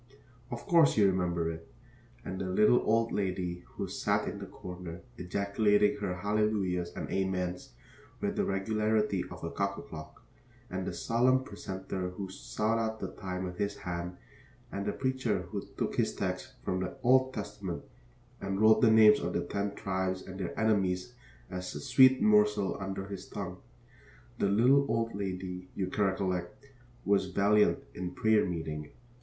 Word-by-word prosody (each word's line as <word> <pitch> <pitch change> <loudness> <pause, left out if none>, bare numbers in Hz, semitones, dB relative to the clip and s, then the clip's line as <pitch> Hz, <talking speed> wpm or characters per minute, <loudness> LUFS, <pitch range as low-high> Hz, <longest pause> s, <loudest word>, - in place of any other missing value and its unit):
Of 120 -2 -6
course 165 -7 +5
you 105 - +6
remember 90 -3 +1
it, 80 0 -10 0.5
and 95 +1 -4
the 95 - -2
little 105 +6 +5
old 115 +1 +2
lady 90 -3 -2
who - - -3
sat - - 0
in - - -5
a - - -6
corner 90 -1 -8 0.2
ejaculating 105 +3 +2
her 100 -3 -2
hallelujahs 100 -3 0
and - - -4
amens 90 -5 -2 0.5
with - - -1
the - - +1
regularity 105 0 +1
of 90 0 -10
a 85 - -3
cuckoo 100 0 -2
clock, 80 -1 -10 0.5
and 95 0 -3
the - - -1
solemn 125 +7 +2
precentor 95 -3 -5
who 95 -1 -5
sawed 110 +4 -1
out 110 -1 -2
the - - -4
time 90 -2 -5
with 90 -1 -6
his 100 0 -1
hand, 90 0 -5 0.5
and 100 0 -3
the - - +2
preacher 130 -1 -1
who - - -4
took - - -2
his - - +1
texts - - -3
from 90 - -1
the 95 - -4
Old 130 +1 +5
Testament 105 -6 -5 0.6
and 95 0 -2
rolled 110 0 +6
the 115 - +6
names 110 -1 +7
of - - -3
the - - 0
Ten 100 0 -3
Tribes 95 -1 -2
and 95 0 -9
their 90 - -4
enemies 100 -1 +1 0.4
as 90 -2 -5
a - - -4
sweet 130 - +6
morsel 105 -2 +4
under 95 0 -4
his 100 -1 -7
tongue. 90 -3 -6 0.8
The 100 - +2
little 125 +7 +5
old 115 0 0
lady, 90 -2 -4
you 95 -1 -2
recollect, 95 +4 -1 0.4
was 100 -1 +3
valiant 100 +3 +3
in 90 0 -5
prayer 110 -2 +3
meeting. 80 -3 -4
95 Hz, 160 wpm, -31 LUFS, 90-105 Hz, 0.8 s, names